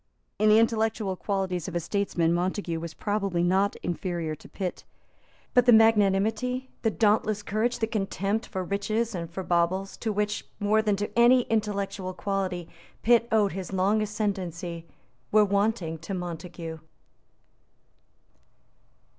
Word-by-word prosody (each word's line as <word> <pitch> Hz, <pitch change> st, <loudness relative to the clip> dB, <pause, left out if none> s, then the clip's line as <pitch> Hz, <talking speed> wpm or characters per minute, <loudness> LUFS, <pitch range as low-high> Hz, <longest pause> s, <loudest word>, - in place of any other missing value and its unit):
In 215 Hz, +1 st, +4 dB
the 215 Hz, -, +7 dB
intellectual 220 Hz, -3 st, +1 dB
qualities 190 Hz, -3 st, -2 dB
of 180 Hz, -, -6 dB
a -, -, +2 dB
statesman 170 Hz, -2 st, 0 dB
Montague 175 Hz, -1 st, -1 dB
was 165 Hz, -1 st, -7 dB
probably 200 Hz, -4 st, -1 dB
not 190 Hz, +3 st, +2 dB
inferior 175 Hz, -2 st, -2 dB
to 155 Hz, -, -12 dB
Pitt. 185 Hz, -3 st, -4 dB, 0.7 s
But 250 Hz, -1 st, +4 dB
the -, -, +9 dB
magnanimity, 225 Hz, +4 st, +3 dB
the 225 Hz, -, +2 dB
dauntless 215 Hz, -1 st, +1 dB
courage, 220 Hz, +4 st, 0 dB
the 230 Hz, -, 0 dB
contempt 210 Hz, 0 st, -2 dB
for 190 Hz, -2 st, -3 dB
riches 215 Hz, +4 st, -1 dB
and 170 Hz, -3 st, -4 dB
for 185 Hz, +3 st, -5 dB
baubles, 180 Hz, +3 st, 0 dB
to 220 Hz, -, -2 dB
which, 210 Hz, 0 st, -1 dB, 0.2 s
more 210 Hz, +1 st, +3 dB
than 210 Hz, -2 st, +1 dB
to 205 Hz, +1 st, -3 dB
any 240 Hz, +2 st, +6 dB
intellectual 200 Hz, -4 st, -1 dB
quality, 190 Hz, -4 st, -2 dB, 0.4 s
Pitt 235 Hz, 0 st, +4 dB
owed 210 Hz, -3 st, +3 dB
his 190 Hz, +1 st, -6 dB
long 195 Hz, +3 st, +2 dB
ascendency, 185 Hz, -6 st, -3 dB, 0.4 s
were 210 Hz, 0 st, +6 dB
wanting 200 Hz, -5 st, 0 dB
to 180 Hz, +5 st, -5 dB
Montague. 170 Hz, -2 st, -6 dB
200 Hz, 140 wpm, -27 LUFS, 180-215 Hz, 0.7 s, the